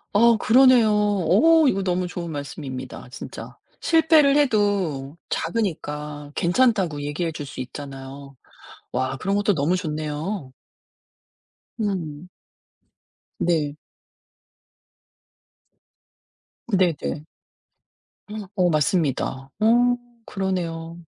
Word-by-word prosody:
아 230 Hz, +3 st, +5 dB
그러네요. 250 Hz, -2 st, +6 dB
오 210 Hz, -, +4 dB
이거 195 Hz, -3 st, +1 dB
너무 180 Hz, -1 st, 0 dB
좋은 175 Hz, -1 st, -5 dB
말씀입니다 140 Hz, -4 st, -7 dB
진짜. 130 Hz, -, -9 dB, 0.2 s
실패를 315 Hz, -3 st, +4 dB
해도 200 Hz, -, +1 dB
작으니까 150 Hz, -6 st, -3 dB
괜찮다고 180 Hz, -, +2 dB
얘기해 155 Hz, +3 st, -2 dB
줄 150 Hz, -2 st, -6 dB
수 130 Hz, -, -8 dB
있잖아요. 135 Hz, +1 st, -8 dB, 0.6 s
와 130 Hz, +1 st, -1 dB
그런 195 Hz, +6 st, -1 dB
것도 205 Hz, 0 st, +2 dB
너무 155 Hz, +4 st, +1 dB
좋네요. 155 Hz, -1 st, -4 dB, 1.3 s
음. 180 Hz, -6 st, -3 dB, 1.1 s
네. 155 Hz, -4 st, 0 dB, 2.9 s
네네. 180 Hz, -7 st, 0 dB, 1.3 s
어 180 Hz, -3 st, +3 dB
맞습니다. 145 Hz, -4 st, 0 dB
어 240 Hz, +3 st, +4 dB, 0.3 s
그러네요. 170 Hz, -4 st, -3 dB
175 Hz, 185 characters per minute, -23 LUFS, 145-205 Hz, 2.9 s, 그러네요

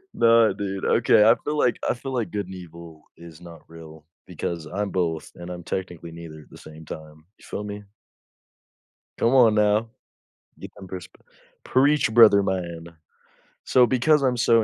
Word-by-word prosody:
Nah, 115 Hz, -1 st, +4 dB
dude, 95 Hz, -1 st, -5 dB
okay. 115 Hz, -2 st, +4 dB
I 115 Hz, -, +7 dB
feel 150 Hz, +1 st, -3 dB
like 125 Hz, -4 st, +1 dB
I -, -, +1 dB
feel 135 Hz, +2 st, -7 dB
like 115 Hz, -7 st, -2 dB
good 100 Hz, +2 st, -4 dB
and 95 Hz, -, -11 dB
evil 85 Hz, -3 st, -12 dB, 0.2 s
is 85 Hz, -1 st, -14 dB
not 85 Hz, -1 st, -13 dB
real 80 Hz, -2 st, -14 dB, 0.2 s
because 85 Hz, -3 st, -5 dB
I'm 100 Hz, +5 st, -4 dB
both, 85 Hz, -4 st, -2 dB
and 85 Hz, 0 st, -10 dB
I'm 90 Hz, -1 st, -8 dB
technically 90 Hz, -2 st, -6 dB
neither 80 Hz, -2 st, -11 dB
at -, -, -21 dB
the -, -, -13 dB
same 80 Hz, 0 st, -13 dB
time, 80 Hz, 0 st, -11 dB
you -, -, -20 dB
feel 105 Hz, -, -6 dB
me? 105 Hz, 0 st, -7 dB, 1.4 s
Come 115 Hz, -, +2 dB
on, 120 Hz, -5 st, +5 dB
now. 105 Hz, +1 st, +2 dB, 0.7 s
Get -, -, -10 dB
them 95 Hz, -2 st, -12 dB
perspec 90 Hz, -1 st, -10 dB, 0.4 s
preach, 140 Hz, -3 st, +2 dB
brother 110 Hz, -4 st, +7 dB
man. 85 Hz, -4 st, -4 dB, 0.8 s
So, 125 Hz, -1 st, +4 dB
because 130 Hz, +5 st, +2 dB
I'm 130 Hz, -2 st, +1 dB
so 115 Hz, -1 st, +3 dB
95 Hz, 170 wpm, -23 LUFS, 85-115 Hz, 1.4 s, I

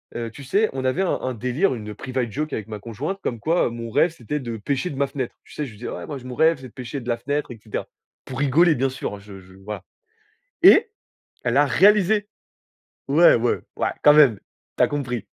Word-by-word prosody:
heu, 115 Hz, -1 st, -3 dB
tu 140 Hz, -, -11 dB
sais, 205 Hz, +11 st, +2 dB
on 135 Hz, -1 st, -3 dB
avait 130 Hz, +8 st, +1 dB
un 190 Hz, -, +1 dB
un 130 Hz, -, -2 dB
délire, 125 Hz, -, 0 dB
une 105 Hz, -2 st, -7 dB
private 130 Hz, +1 st, -3 dB
joke 150 Hz, +6 st, -3 dB
avec 110 Hz, -2 st, -4 dB
ma 105 Hz, -1 st, -6 dB
conjointe, 120 Hz, -, -5 dB
comme 120 Hz, -, -2 dB
quoi, 165 Hz, +7 st, +1 dB
mon 115 Hz, 0 st, -6 dB
rêve, 165 Hz, +9 st, +3 dB
c'était 150 Hz, -1 st, -4 dB
de 120 Hz, -3 st, -5 dB
pêcher 140 Hz, -, -2 dB
de 140 Hz, -, -7 dB
ma 140 Hz, 0 st, +1 dB
fenêtre. 135 Hz, -3 st, -4 dB
Tu -, -, -16 dB
sais, 150 Hz, -, -3 dB
je 130 Hz, -, -9 dB
lui 105 Hz, -, -15 dB
dis: 120 Hz, -, -7 dB
«Ouais, -, -, -6 dB
moi, 145 Hz, -, -6 dB
mon 125 Hz, -1 st, -6 dB
rêve, 160 Hz, +4 st, +4 dB
c'est 130 Hz, -, -9 dB
de 120 Hz, -, -19 dB
pêcher 125 Hz, +2 st, -6 dB
de 120 Hz, -, -11 dB
la 120 Hz, -, +2 dB
fenêtre, 145 Hz, +5 st, -2 dB
et 120 Hz, -, -8 dB
cetera». 105 Hz, -, -5 dB, 0.4 s
Pour 130 Hz, 0 st, -6 dB
rigoler, 155 Hz, +4 st, +4 dB
bien 135 Hz, +1 st, +1 dB
sûr, 130 Hz, -5 st, -5 dB
je 100 Hz, -1 st, -12 dB
je 95 Hz, 0 st, -17 dB
voilà 100 Hz, +2 st, -7 dB, 0.8 s
et -, -, +8 dB, 0.6 s
elle 120 Hz, -1 st, +1 dB
l'a 145 Hz, +2 st, +5 dB
réalisé. 205 Hz, +5 st, +4 dB, 0.8 s
Ouais. 160 Hz, +5 st, +6 dB
Ouais, 120 Hz, 0 st, 0 dB, 0.2 s
ouais, -, -, 0 dB
quand 150 Hz, -, +8 dB
même, 140 Hz, -9 st, +6 dB, 0.4 s
tu -, -, +2 dB
as -, -, 0 dB
compris. 125 Hz, -7 st, -3 dB
130 Hz, 235 wpm, -23 LUFS, 115-150 Hz, 0.8 s, et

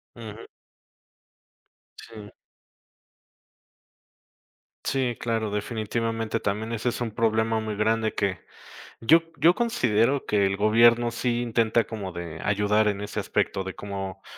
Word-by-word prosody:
Ujú. 110 Hz, -1 st, -9 dB, 1.6 s
Sí. 105 Hz, -2 st, -12 dB, 2.5 s
Sí, 130 Hz, -3 st, 0 dB
claro, 115 Hz, -2 st, -2 dB
definitivamente 115 Hz, +1 st, -2 dB
también 110 Hz, +3 st, -2 dB
ese 115 Hz, +2 st, -1 dB
es 120 Hz, -, -4 dB
un 115 Hz, -3 st, -3 dB
problema 110 Hz, 0 st, +1 dB
muy 110 Hz, -1 st, -4 dB
grande 110 Hz, +1 st, +1 dB
que, 100 Hz, -2 st, -1 dB, 0.6 s
yo 160 Hz, +8 st, +5 dB, 0.2 s
yo 170 Hz, +3 st, +5 dB
considero 135 Hz, -, +1 dB
que 100 Hz, -2 st, +2 dB
el 95 Hz, 0 st, -2 dB
gobierno 115 Hz, +3 st, +4 dB
sí 120 Hz, 0 st, -1 dB
intenta 115 Hz, -1 st, +2 dB
como 100 Hz, -5 st, -6 dB
de, 85 Hz, -2 st, -7 dB
ayudar 105 Hz, +1 st, +2 dB
en 100 Hz, -1 st, -1 dB
ese 105 Hz, -, -4 dB
aspecto, 95 Hz, -, -1 dB
de 95 Hz, 0 st, -6 dB
como 95 Hz, -1 st, -6 dB
110 Hz, 120 wpm, -25 LUFS, 105-115 Hz, 2.5 s, yo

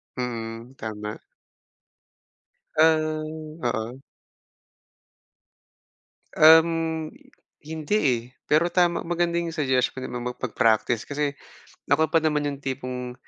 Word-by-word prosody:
Mm, 115 Hz, 0 st, -5 dB
tama. 105 Hz, -1 st, -6 dB, 1.6 s
Ah, 155 Hz, 0 st, +3 dB, 0.4 s
oo. 120 Hz, +1 st, -2 dB, 2.4 s
Um, 160 Hz, 0 st, +5 dB, 0.6 s
hindi, 160 Hz, +5 st, -2 dB
eh, 130 Hz, -, +2 dB, 0.3 s
pero 155 Hz, +3 st, +4 dB
tama 175 Hz, -1 st, +2 dB
maganda 170 Hz, 0 st, 0 dB
yung 170 Hz, -1 st, -4 dB
suggestion 130 Hz, -3 st, 0 dB
mo 125 Hz, -, -4 dB
ma 125 Hz, 0 st, -4 dB
mag-praktis 115 Hz, -2 st, +1 dB
kasi, 145 Hz, 0 st, -1 dB, 0.6 s
ako 155 Hz, +3 st, +2 dB
pa 165 Hz, -, +4 dB
naman 150 Hz, -2 st, 0 dB
yung 140 Hz, -, -7 dB
tipong 125 Hz, -2 st, -4 dB
145 Hz, 95 wpm, -25 LUFS, 125-160 Hz, 2.4 s, Um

